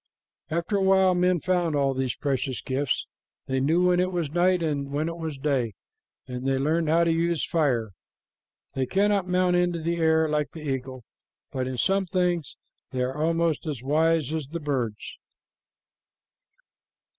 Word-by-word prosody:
After 170 +6 -1
a - - 0
while 190 -1 +4
men 180 -1 +2
found 175 -4 +1
all 140 -1 +2
these 130 -1 -2
precious 135 -2 -2
gifts. 135 0 -1 0.4
They 130 0 -1
knew 160 +7 +2
when 180 0 +3
it 185 +1 +1
was 170 -5 -2
night 175 +1 +2
and 145 -3 -1
when 145 +3 -1
it 165 - -4
was 160 -4 -5
day, 135 -7 -1 0.5
and 125 +1 -5
they 135 0 +2
learned 155 +4 +1
how 165 +2 +4
to 170 - +2
use 165 -1 +1
fire. 130 - 0 0.8
They 130 -1 -1
cannot 200 -1 +2
mount 180 0 +2
into 175 -1 +1
the 170 +1 -2
air 160 -1 +3
like 150 -1 -1
the 155 -2 -7
eagle, 130 -2 -4 0.5
but 130 -1 -2
in 130 -1 -4
some 195 +7 +1
things 175 -3 -1 0.3
they 130 -1 -1
are 130 +1 -2
almost 165 +1 0
as 140 -6 -4
wise 155 +1 +2
as 155 -4 -3
the 170 +4 -5
birds. 130 -8 -3
160 Hz, 170 wpm, -26 LUFS, 135-175 Hz, 0.8 s, while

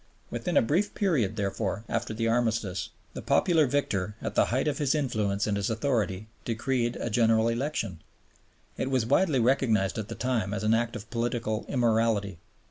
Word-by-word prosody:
Within - - -1
a - - +6
brief 170 - 0
period, 135 - +1
therefore, 100 0 -2
after 115 -1 -2
the 115 +1 -1
Armistice, 115 -5 0 0.2
the - - -6
popular 160 -5 +3
victor, 105 -8 -1
at - - -4
the - - +4
height 130 +5 0
of 150 - -1
his 145 0 +2
influence 105 -8 0
and 105 - 0
his 100 -1 -1
authority, 110 -5 -1 0.2
decreed 120 +1 -1
a 120 - -3
General 115 0 +3
Election. 115 - -2 0.8
It 130 - -1
was 130 -4 +1
widely 150 +2 +3
recognized 115 -5 +2
at 105 - -4
the - - -6
time 115 -5 -1
as 100 - -3
an 110 +1 +3
act 115 +1 0
of 110 0 -8
political 115 -2 -1
immorality. 110 -6 +1
115 Hz, 175 wpm, -28 LUFS, 105-130 Hz, 0.8 s, a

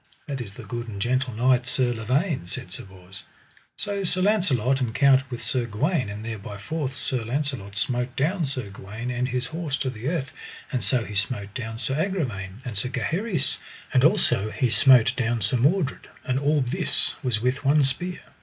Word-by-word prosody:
That 140 -3 -3
is 100 -4 -8
the - - -9
good 120 -1 -5
and 100 -3 -6
gentle 130 +3 +1
knight 125 +1 +3
Sir 130 -1 +1
Lavaine, 130 - 0
said 90 0 -6
Sir - - -6
Bors. 95 0 -11 0.5
So 200 -1 -1
Sir 185 0 +1
Launcelot 140 - +3
encountered 130 +3 +4
with 120 -2 -5
Sir 125 -3 0
Gawaine, 130 - 0
and 105 +2 -6
there 110 -2 -4
by 100 +1 -7
force 135 +5 -3
Sir 130 -3 0
Launcelot 125 -5 -2
smote 125 +3 -1
down 160 +3 +1
Sir 130 -7 -4
Gawaine 110 +5 -6
and 125 +1 -1
his 125 0 -1
horse 160 -1 -3
to 130 - -1
the 115 +1 -6
earth, 150 -6 -2 0.4
and 130 -4 -1
so 125 -4 +1
he 105 - -7
smote 105 -1 -1
down 110 -2 -4
Sir 130 +3 0
Agravaine 120 - -3
and 120 -4 -4
Sir 105 +5 -1
Gaheris, 170 - -1 0.3
and 130 -1 +5
also 155 - +3
he 125 +1 0
smote 125 -1 +6
down 120 -1 0
Sir 110 +5 +1
Mordred, 145 +4 +1 0.2
and 130 +1 +1
all 145 +1 +2
this 150 +8 0
was 125 -6 +1
with 125 +4 0
one 145 +1 +5
spear. 175 +7 -1
125 Hz, 190 wpm, -25 LUFS, 110-145 Hz, 0.5 s, smote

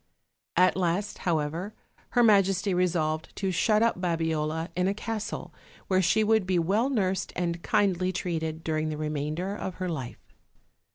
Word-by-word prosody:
At 185 +1 +5
last, 185 +3 -1
however, 165 +6 -1 0.4
her 240 - +7
majesty 195 -3 +4
resolved 160 -3 0
to 195 -1 -1
shut 215 +4 +3
up 230 -6 +1
Babiola 160 -1 -1
in 180 +1 +1
a 195 - 0
castle, 215 0 -4 0.4
where 185 -1 +4
she 190 +5 +3
would 220 -3 +2
be 185 -1 +2
well 200 +10 +2
nursed 195 -7 0
and 170 -1 -2
kindly 185 -2 +1
treated 160 -3 -3
during 155 -1 -1
the 155 - -4
remainder 155 +5 -2
of 190 -4 -5
her 185 -1 -3
life. 135 -7 -7
180 Hz, 155 wpm, -27 LUFS, 160-195 Hz, 0.4 s, her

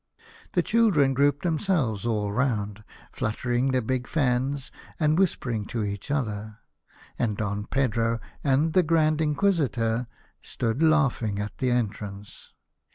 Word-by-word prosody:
The - - +2
children 195 -13 +3
grouped 140 +1 +2
themselves 155 - 0
all 105 -3 0
round, 105 -3 -1 0.3
fluttering 120 +4 -1
their 130 -2 +1
big 125 +2 -2
fans 135 -1 0 0.3
and 155 -1 +3
whisper 170 -8 +1
ing 110 -3 -2
to 115 -1 -3
each 100 +4 -4
other, 110 -6 -2 0.6
and 105 -4 0
Don 105 -1 -3
Pedro 115 -3 0 0.2
and 145 +3 +2
the 185 - +6
Grand 155 -2 +2
Inquisitor 140 - +1 0.3
stood 115 +4 -2
laughing 135 -10 +2
at 105 +1 -4
the 130 - +1
en 120 -3 +2
trance. 100 0 -10
125 Hz, 135 wpm, -26 LUFS, 110-150 Hz, 0.6 s, the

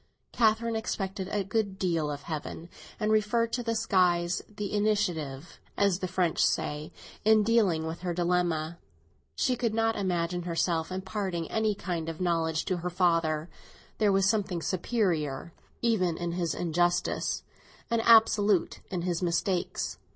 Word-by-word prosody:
Catherine 225 0 +2
expected 195 -3 -3
a 205 -1 0
good 200 -1 -1
deal 165 -5 0
of 145 0 -5
Heaven, 160 +2 -6 0.3
and 215 -1 +1
referred 225 +2 +2
to 245 - 0
the 230 -1 -1
skies 180 -5 +2
the 210 -1 -5
initiative, 175 -9 -1 0.2
as 200 -3 +2
the 185 - -2
French 180 -2 +1
say, 155 -1 -1 0.3
in 215 0 +5
dealing 205 -8 +2
with 160 +1 -4
her 180 -1 -3
dilemma. 170 -2 0 0.6
She 255 -3 +1
could 230 -3 -1
not 225 0 +2
imagine 175 -2 -1
herself 170 -1 -1
imparting 190 -3 -3
any 220 -2 +1
kind 170 -4 -3
of 165 - -6
knowledge 165 -3 0
to 185 - 0
her 175 +1 -3
father, 165 -3 +1 0.5
there 210 -2 +4
was 195 0 +3
something 195 -6 0
superior 170 - -1 0.3
even 185 -8 +2
in 175 -1 -3
his 170 -1 -1
injustice 175 +1 0 0.5
and 230 -1 +2
absolute 215 -5 +4
in 180 -3 -3
his 175 -1 -1
mistakes. 175 +1 -1
180 Hz, 145 wpm, -29 LUFS, 170-210 Hz, 0.6 s, in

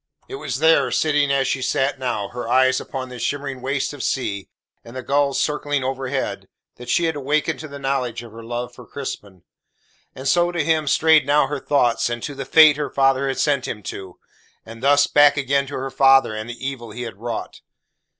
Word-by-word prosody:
It - - -7
was 140 -3 -4
there, 160 +3 +4
sitting 145 -2 +1
as 135 -1 +1
she 135 - -1
sat 135 +1 0
now, 120 -6 -2
her 120 -1 -6
eyes 130 +1 +3
upon 130 -1 -6
the 125 -1 -9
shimmering 140 -2 -3
waste 135 +2 -2
of 145 - -8
sea, 100 -8 -2 0.3
and 115 +2 -13
the 130 - -5
gulls 140 +1 +1
circling 145 -2 -1
overhead, 135 0 -3 0.3
that 125 0 -10
she 170 - +2
had 160 -2 0
awakened 150 +3 -1
to 155 - -7
the 140 -1 -9
knowledge 130 -4 -2
of 115 - -12
her 115 +1 -11
love 120 +1 -5
for 125 -1 -14
Crispin. 100 -9 -7 0.7
And 130 +1 -6
so 175 +4 +3
to 170 -3 -1
him 155 -1 +1
strayed 155 0 +4
now 145 0 +4
her 145 +1 -4
thoughts, 120 -5 +1
and 120 -1 -4
to 145 - -4
the 135 -1 -6
fate 155 -1 +6
her 150 - -3
father 135 0 +2
had 135 - -2
sent 140 -3 +1
him 105 -3 -6
to; 95 -2 -10 0.5
and 115 0 -11
thus 145 +1 +4
back 145 0 +5
again 140 0 0
to 145 - -7
her 135 +1 -4
father 135 -3 +4
and 110 +2 -6
the 120 +3 -6
evil 125 -4 -6
he 120 +4 -7
had 115 -5 -7
wrought. 115 +1 -6
135 Hz, 210 wpm, -21 LUFS, 125-145 Hz, 0.7 s, fate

